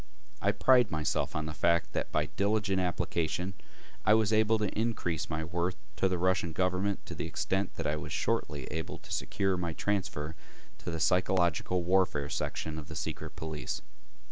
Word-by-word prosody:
I - - +4
pride 125 -4 +5
myself 80 -3 0
on 75 0 -1
the 75 - -4
fact 85 +1 +2
that - - -2
by 75 - +2
diligent 100 -1 +2
application 90 0 -1 0.5
I 105 0 +6
was 110 -1 +3
able 110 +1 +4
to 105 -1 +1
increase 105 -8 -1
my 80 0 -1
worth 85 +2 -1 0.2
to 95 - +3
the 90 - 0
Russian 90 -1 +1
government 95 +3 0
to - - -6
the - - -3
extent 95 0 -1
that - - -4
I 75 +1 +1
was - - -6
shortly 70 -3 0
able 80 +1 -3
to - - -14
secure 95 -2 0
my 85 -2 -2
transfer 80 -6 -1 0.5
to - - -5
the 80 -1 -2
psychological 90 0 +2
warfare 90 -5 +2
section 80 +1 -2
of 75 - -9
the - - -7
secret - - -4
police. 80 -2 -4
90 Hz, 175 wpm, -31 LUFS, 80-95 Hz, 0.5 s, I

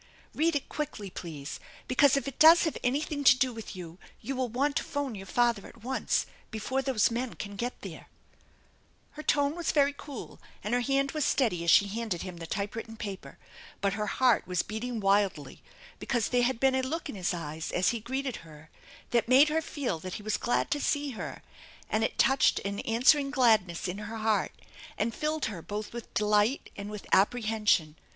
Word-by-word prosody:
Eead 325 +1 +2
it 285 - -1
quickly, 215 -10 -5
please, 155 -5 -7 0.3
because 280 +2 +4
if 275 - -2
it 275 - -7
does 325 +2 +8
have 320 - -1
anything 285 +3 -1
to 255 -2 +7
do 255 -1 +1
with 225 -3 -8
you, 175 -1 -9 0.2
you 270 - -4
will 255 -1 -1
want 280 +5 0
to - - 0
phone 285 -4 -3
your 195 -2 -8
father 235 -1 +1
at 225 - -16
once, 260 +2 0 0.2
before 245 +5 -2
those 260 -5 +2
men 240 +1 -3
can 200 -1 -7
get 240 +5 -4
there/' - - -9 1.0
Her 305 - -8
tone 285 0 +1
was 345 -1 -1
very 285 -1 +3
cool, 280 -3 -9 0.2
and 210 - -2
her 245 - +2
hand 275 +2 +1
was 305 -1 -1
steady 220 -12 +1
as 170 - 0
she 200 - +6
handed 215 -4 -3
him 185 -2 -7
the 165 -1 -7
typewritten 220 +4 -4
paper, 200 -4 -7 0.4
but 200 -1 0
her 210 0 -2
heart 250 +1 +2
was 180 -2 0
beat 220 +2 -5
ing 250 -1 -3
mildly, 195 -8 +1 0.4
because 240 -4 -1
there 245 -1 +2
had 245 -1 +1
been 265 0 +3
a 260 - +2
look 300 +6 -3
in - - -6
his 185 -4 -1
eyes 160 -2 -5
as 180 +1 +2
he 235 - -1
greeted 260 +2 -3
her 155 -1 -14 0.4
that 235 -1 +2
made 275 +4 +7
her 320 +1 +1
feel 275 - -3
that 185 +2 -6
he 210 - -7
was 215 0 0
glad 240 - 0
to 290 - 0
see 290 -1 0
her, 230 - -7 0.5
and 215 +1 +1
it - - -1
touched 270 0 +4
an 200 +1 -4
answering 270 +5 +3
gladness 220 -11 +2
in 180 +3 -4
her 215 +2 -6
heart 220 -1 0 0.4
and 225 +2 0
filled 305 +3 -1
her 205 -6 -5
both 210 +5 -6
with 235 -1 -8
delight 210 +5 +2
and 200 0 -6
with 210 -1 -7
apprehension. 210 -6 +2
230 Hz, 200 wpm, -29 LUFS, 200-270 Hz, 1.0 s, does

